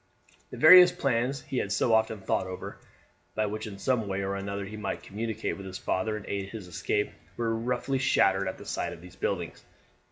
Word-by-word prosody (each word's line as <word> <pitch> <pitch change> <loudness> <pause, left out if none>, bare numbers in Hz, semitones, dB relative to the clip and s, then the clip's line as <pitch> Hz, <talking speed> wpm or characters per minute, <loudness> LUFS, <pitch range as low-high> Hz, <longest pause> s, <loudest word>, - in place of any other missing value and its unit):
The - - -8
various 180 +3 +9
plans 135 -5 0
he 135 -4 -2
had 100 - -2
so 105 +3 +2
often 110 -1 +2
thought 95 - 0
over, 90 0 -7 0.6
by 110 - +1
which, 110 +1 -4
in 100 -2 -8
some 115 0 0
way 95 0 -2
or 100 0 -2
other, 100 0 -4
he 105 +2 -8
might 105 -2 -4
communicate 110 +2 -3
with 100 -1 -8
his 95 0 -6
father 105 +3 -1
and 100 - -9
aid 100 -1 -3
his 105 -2 -8
escape, 105 +4 -1 0.3
were 115 -1 0
roughly 125 +3 -1
shattered 100 -7 +3
at 95 - -4
the - - -11
sight - - -3
of 85 - -12
these 90 0 -13
buildings. 90 -4 -3
105 Hz, 210 wpm, -28 LUFS, 95-115 Hz, 0.6 s, various